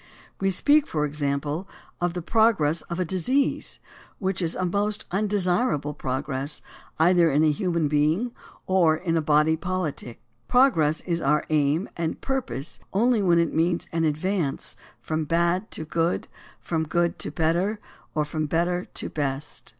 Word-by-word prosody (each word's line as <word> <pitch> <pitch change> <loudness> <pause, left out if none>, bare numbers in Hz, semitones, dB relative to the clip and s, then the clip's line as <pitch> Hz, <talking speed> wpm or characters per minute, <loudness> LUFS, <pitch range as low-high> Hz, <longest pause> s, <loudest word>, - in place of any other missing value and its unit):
We 195 - +1
speak, 290 - +3
for 150 -2 0
example, 145 +4 -2 0.3
of 175 0 0
the 175 - -3
progress 195 -8 +3
of 170 +1 -3
a 185 - +1
disease, 250 - 0 0.4
which 190 -2 -1
is 170 -2 -1
a 185 - -1
most 205 +3 -1
undesirable 190 - +1
progress 135 +1 -2 0.4
either 170 +1 +5
in 145 +2 +3
a 155 - +4
human 170 0 0
being 155 +11 +1 0.3
or 175 -4 +4
in 165 -1 -1
a 165 - +2
body 150 +1 +3
poHtic. 165 -8 -3 0.3
Progress 165 - +3
is 170 -2 -2
our 150 +2 +2
aim 150 +4 +2
and 165 -1 -2
purpose 165 - -3
only 230 +2 +3
when 175 -3 +4
it 170 -1 +1
means 170 +2 +1
an 165 0 0
advance 160 0 -1 0.3
from 155 0 -1
bad 170 +5 +1
to 160 - -4
good, 165 +2 -1 0.3
from 160 -2 -2
good 170 +2 0
to - - -2
better, 175 +6 0 0.4
or 150 -1 +1
from 155 +1 -2
better 175 +3 0
to - - -1
best. 145 -1 -4
170 Hz, 155 wpm, -25 LUFS, 150-185 Hz, 0.4 s, either